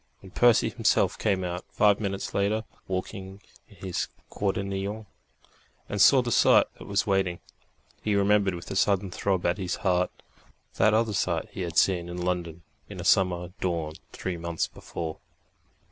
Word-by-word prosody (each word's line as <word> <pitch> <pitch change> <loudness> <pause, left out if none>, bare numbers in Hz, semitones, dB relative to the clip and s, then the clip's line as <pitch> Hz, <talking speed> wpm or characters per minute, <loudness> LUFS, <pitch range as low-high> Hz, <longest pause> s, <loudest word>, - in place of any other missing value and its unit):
When 95 - -13
Percy 120 0 +4
himself 115 0 +2
came 95 -4 +1
out, 90 0 -4
five 105 -1 +3
minutes 100 -2 -3
later, 105 +2 +1 0.2
walking 95 +1 -5 0.3
in - - -18
his 90 - -2 0.2
quaternion, 100 +2 -2 0.8
and 105 - -1
saw 130 +4 +7
the 120 - -3
sight - - +5
that - - -10
was 100 0 +1
waiting, 95 -3 0 0.6
he 105 -1 0
remembered 100 -1 +3
with 85 - -8
a - - -3
sudden 100 -1 +2
throb 95 -1 -1
at 85 +3 +1
his 90 -2 -2
heart 90 -1 +2 0.7
that 110 0 +4
other 110 -1 +1
sight 85 -4 -1
he - - -6
had 85 -2 -4
seen 90 -3 +3
in 90 - -6
London 90 -2 -3 0.3
in - - -8
a - - -4
summer 90 -2 +2
dawn 85 -4 -2 0.2
three 90 -2 -4
months 85 0 -2
before.... 80 -2 -7
95 Hz, 160 wpm, -27 LUFS, 90-100 Hz, 0.8 s, saw